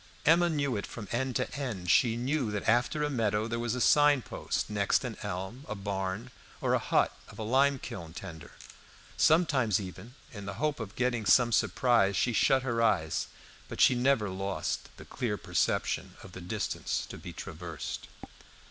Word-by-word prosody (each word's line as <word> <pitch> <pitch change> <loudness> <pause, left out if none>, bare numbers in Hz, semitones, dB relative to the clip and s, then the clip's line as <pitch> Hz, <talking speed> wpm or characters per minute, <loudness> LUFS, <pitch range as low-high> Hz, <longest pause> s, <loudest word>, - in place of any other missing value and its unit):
Emma 170 +3 +5
knew 140 -5 0
it 100 - -3
from 105 -4 -8
end 130 +1 -1
to 130 - -1
end; 110 -11 -2
she 115 -3 +4
knew 130 0 0
that 105 -1 -3
after 120 +6 +2
a - - +2
meadow 110 -4 0
there 115 0 -2
was 120 0 -1
a - - -2
sign 145 +3 +5
post, - - -3
next 100 -1 +1
an - - -4
elm, 95 +9 -5
a 110 - -3
barn, 100 +3 -3 0.3
or - - 0
the - - +3
hut - - +1
of - - -13
a 110 - -4
lime 135 +5 +3
kiln 85 -9 -7
tender. 85 -2 -9 0.6
Sometimes 140 - +3
even, 105 +6 -9 0.2
in 100 -2 -8
the 100 - -5
hope 150 +4 -1
of 105 -3 -6
getting 120 -4 0
some 120 +5 +5
surprise, 115 -4 +3
she 125 - +1
shut 135 +3 +3
her 120 -3 0
eyes, 80 -8 +1 0.4
but - - -8
she - - +6
never 125 -3 +2
lost 95 +1 -3
the - - -11
clear 110 -4 -3
perception 90 -5 -1
of 95 - -11
the 95 - -9
distance 95 +3 -2
to - - -8
be 85 +2 -8
traversed. 85 -2 -6
115 Hz, 185 wpm, -30 LUFS, 100-130 Hz, 0.6 s, she